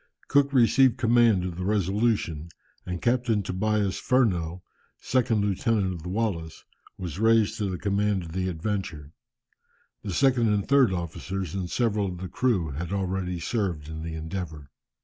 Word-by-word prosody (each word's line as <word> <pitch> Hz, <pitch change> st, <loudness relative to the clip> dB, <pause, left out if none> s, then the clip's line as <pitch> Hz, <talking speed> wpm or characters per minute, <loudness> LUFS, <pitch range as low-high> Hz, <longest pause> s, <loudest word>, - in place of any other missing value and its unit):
Cook 140 Hz, -1 st, +3 dB
received 130 Hz, 0 st, +4 dB
command 115 Hz, -6 st, +4 dB
of 90 Hz, -2 st, -5 dB
the 90 Hz, -, -3 dB
Resolution, 100 Hz, -4 st, 0 dB, 0.4 s
and 90 Hz, -2 st, -4 dB
Captain 120 Hz, -4 st, +1 dB
Tobias 100 Hz, +1 st, 0 dB
Furneaux, 90 Hz, -9 st, +1 dB, 0.4 s
second 115 Hz, -4 st, +1 dB
lieutenant 100 Hz, -1 st, 0 dB
of 85 Hz, -, -7 dB
the 90 Hz, -, -6 dB
Wallis, 90 Hz, -6 st, -2 dB, 0.3 s
was 90 Hz, -1 st, -6 dB
raised 110 Hz, -1 st, +3 dB
to 100 Hz, -2 st, -1 dB
the 90 Hz, -, -3 dB
command 100 Hz, 0 st, 0 dB
of 80 Hz, -, -9 dB
the 95 Hz, +2 st, -1 dB
Adventure. 90 Hz, -4 st, -4 dB, 0.9 s
The 100 Hz, -, -5 dB
second 120 Hz, +1 st, +3 dB
and 100 Hz, -2 st, 0 dB
third 140 Hz, -6 st, +5 dB
officers, 90 Hz, 0 st, -4 dB
and 95 Hz, -2 st, -3 dB
several 105 Hz, -3 st, 0 dB
of 90 Hz, -1 st, -5 dB
the 90 Hz, +1 st, -6 dB
crew 100 Hz, -, 0 dB
had 85 Hz, +6 st, -5 dB
already 95 Hz, -2 st, -2 dB
served 85 Hz, -5 st, -2 dB
in 80 Hz, 0 st, -6 dB
the 80 Hz, 0 st, -5 dB
Endeavour. 80 Hz, -4 st, -6 dB
95 Hz, 155 wpm, -26 LUFS, 85-110 Hz, 0.9 s, third